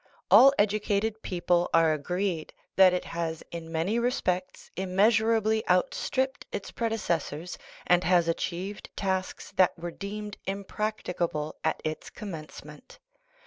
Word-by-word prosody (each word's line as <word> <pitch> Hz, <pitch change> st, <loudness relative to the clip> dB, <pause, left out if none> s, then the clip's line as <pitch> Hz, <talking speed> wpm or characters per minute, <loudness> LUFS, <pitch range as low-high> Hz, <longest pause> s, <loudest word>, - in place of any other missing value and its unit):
All 275 Hz, -, +9 dB
educated 215 Hz, +1 st, +1 dB
people 175 Hz, -1 st, +1 dB
are 165 Hz, -1 st, +5 dB
agreed 175 Hz, +2 st, -2 dB, 0.2 s
that 190 Hz, -1 st, +7 dB
it 180 Hz, -, -2 dB
has 165 Hz, -1 st, -4 dB
in 165 Hz, -1 st, -7 dB
many 175 Hz, +8 st, 0 dB
respects 185 Hz, -7 st, -2 dB
immeasurably 220 Hz, +3 st, +2 dB
outstripped 265 Hz, +8 st, 0 dB
its 200 Hz, -, -5 dB
predeces 225 Hz, -8 st, 0 dB
sors, 160 Hz, +6 st, -7 dB, 0.3 s
and 180 Hz, 0 st, +4 dB
has 175 Hz, -2 st, +3 dB
achieved 180 Hz, +4 st, -3 dB
tasks 190 Hz, -1 st, -2 dB
that 185 Hz, -2 st, +4 dB
were 170 Hz, +1 st, -5 dB
deemed 205 Hz, +2 st, -6 dB
impracti 200 Hz, 0 st, -3 dB
cable 155 Hz, -3 st, -2 dB
at 160 Hz, -, 0 dB
its 155 Hz, 0 st, -4 dB
commencement. 200 Hz, -, -9 dB
185 Hz, 125 wpm, -28 LUFS, 170-215 Hz, 0.3 s, All